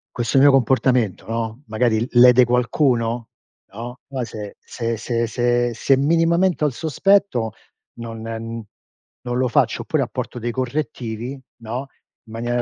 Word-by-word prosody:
Questo 120 +2 0
mio 140 +1 +7
comportamento, 125 -5 +2
no, 115 +3 -4
magari 110 0 +1
lede 125 0 +7
qualcuno, 120 -1 +1 0.4
no, 120 +4 -7
poi 135 -2 -3
se 105 -3 -8
se 115 -1 -4
se 115 +1 -1
se 120 +1 +1
se 130 +4 +2
minimamente 165 +4 +2
ho - - +4
il 140 - -3
sospetto, 160 - +1 0.4
non 115 -1 -8
non 115 +2 -8
lo 130 0 +2
faccio, - - +1
oppure - - 0
apporto - - -5
dei 120 0 -3
correttivi, 120 -2 -3 0.3
no, 120 +5 -4 0.4
in - - -13
maniera 120 +1 -1
120 Hz, 140 wpm, -21 LUFS, 115-130 Hz, 0.4 s, mio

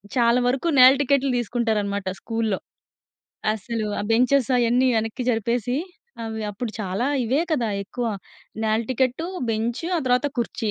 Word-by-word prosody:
చాలా 235 0 +4
వరకు 270 +7 0
నేల 255 +1 +9
టికెట్లు 275 -1 +2
తీసుకుంటారన్నమాట 210 -4 -1
స్కూల్‌లో. 225 -4 -2 0.9
అస్సలు 220 +1 -3
ఆ - - -2
బెంచెస్ 250 +3 +3
అయన్నీ 245 +2 +3
వెనక్కి 225 +3 -2
జరిపేసి, 235 +2 0 0.5
అవి 220 -1 -4
అప్పుడు 220 +3 -5
చాలా 195 +6 -1 0.2
ఇవే 265 +7 +1
కదా 240 -7 +1 0.2
ఎక్కువ. 240 +3 -4 0.6
నేల 220 +1 +2
టికెట్టు, 260 +6 0 0.2
బెంచ్ 230 +5 -2
ఆ - - +1
తర్వాత 250 +3 +3
కుర్చీ. 225 -2 -1
235 Hz, 135 wpm, -23 LUFS, 220-250 Hz, 0.9 s, నేల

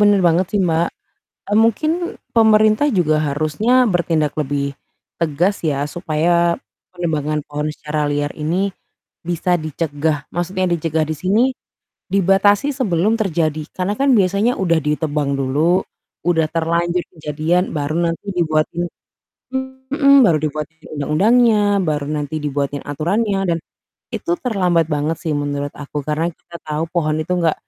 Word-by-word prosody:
benar 205 -1 +5
banget 170 +2 +2
sih, 205 - +2
Mbak. 170 -1 +2 0.6
Eee, 205 - +3
mungkin, 230 +8 +3 0.4
pemerintah 220 +2 +4
juga 155 -3 +3
harusnya 155 - +2
bertindak 160 -4 0
lebih 140 -1 -1 0.5
tegas 170 +5 0
ya, 140 -2 0
supaya 170 0 +1 0.4
penebangan 155 -3 -1
pohon 150 +1 -4
secara 150 0 -2
liar 145 0 -1
ini, 180 +6 0 0.6
bisa 175 +1 +1
dicegah. 155 -1 -2
Maksudnya 185 +1 -1
dicegah 160 -1 0
di 155 +1 -1
sini, 200 +7 +2 0.7
dibatasi 200 +6 +3
sebelum 220 - +1
terjadi. 160 -7 0
Karena 190 +3 -1
kan 275 -1 +4
biasanya 200 +3 +2
udah 170 -6 +1
ditebang 150 -2 -1
dulu, 150 +7 +2 0.4
udah 165 -2 +3
terlanjur 170 +2 0 0.2
kejadian, 155 +5 0
baru 150 +1 -2
nanti 165 +5 -7
dibuatin 170 -1 0 1.0
heeh, 280 -1 +5
baru 165 -7 +4
dibuatin 155 +1 -4 0.2
undang-undangnya, 210 +10 +3 0.2
baru 150 -3 -1
nanti 150 0 -3
dibuatin 145 -1 -2
aturannya, 195 +8 0
dan 165 - +1 0.6
itu 345 - -3
terlambat 180 - +2
banget 150 +1 -1
sih 160 -3 -2
menurut 145 0 -2
aku, 145 0 -5
karena 155 +3 0
kita 170 +2 -12
tahu 155 +1 -2
pohon 155 -3 0
itu 155 - -8
nggak 165 -3 +2
165 Hz, 130 wpm, -19 LUFS, 150-190 Hz, 1.0 s, benar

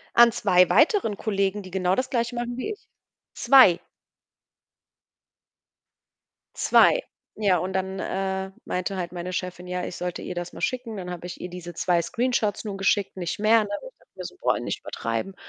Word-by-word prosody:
An 235 0 +8
2 180 -5 +4
weiteren 305 - +3
Kollegen, 200 -1 -1
die 185 - -10
genau 185 -1 +1
das 255 0 -1
Gleiche 235 0 -1
machen 240 0 -3
wie 420 - -3
ich? 415 - -10 0.5
2. 250 -11 +6 2.8
2. - - +5 0.3
Ja, 200 -4 +2
und 185 +2 -3
dann, 190 0 -2
äh, 190 0 -2
meinte 185 +2 -3
halt 175 -1 -4
meine 175 +1 -5
Chefin, 180 0 -4
ja, 180 0 -3
ich - - -6
sollte 180 -1 -4
ihr 180 - -6
das 175 0 -4
mal - - -9
schicken. 245 -4 -2
Dann 180 -1 -6
hab 175 -1 -7
ich 180 - -7
ihr 180 - -6
diese 175 -1 -8
2 175 -2 +1
Screenshots 230 -2 -1
nun 200 -2 -4
geschickt, 195 0 +1
nicht 175 +2 -3
mehr, 220 +1 +5
ne? 205 - -7
Und - - -9
ich - - -51
dachte - - -28
mir 185 -1 -7
so: - - -8
„Boah, - - +2
nicht - - -4
übertreiben.“ 115 +12 -4
190 Hz, 185 wpm, -25 LUFS, 180-225 Hz, 2.8 s, An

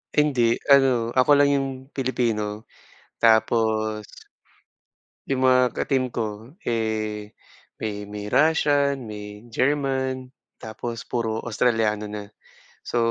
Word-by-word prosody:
Hindi. 130 -6 +3 0.2
Ano, 130 -4 +4
ako 130 +3 +3
lang 140 0 +5
yung 140 -1 +1 0.2
Pilipino 115 -5 -1 0.6
tapos 110 -1 +2 1.2
yung 135 -1 0
mga 130 0 +6 0.2
ka-team 130 -3 0
ko, 110 +2 -4 0.2
eh, 110 -2 -2 0.5
may 105 -1 -4
may 105 0 -7
Russian, 145 -2 +2
may 105 0 -8
German, 130 0 0 0.3
tapos 115 +1 -6
puro 115 -2 -1
Australiano 110 -2 +1
na. 105 -1 -7 0.5
So, - - -5
115 Hz, 100 wpm, -24 LUFS, 110-130 Hz, 1.2 s, mga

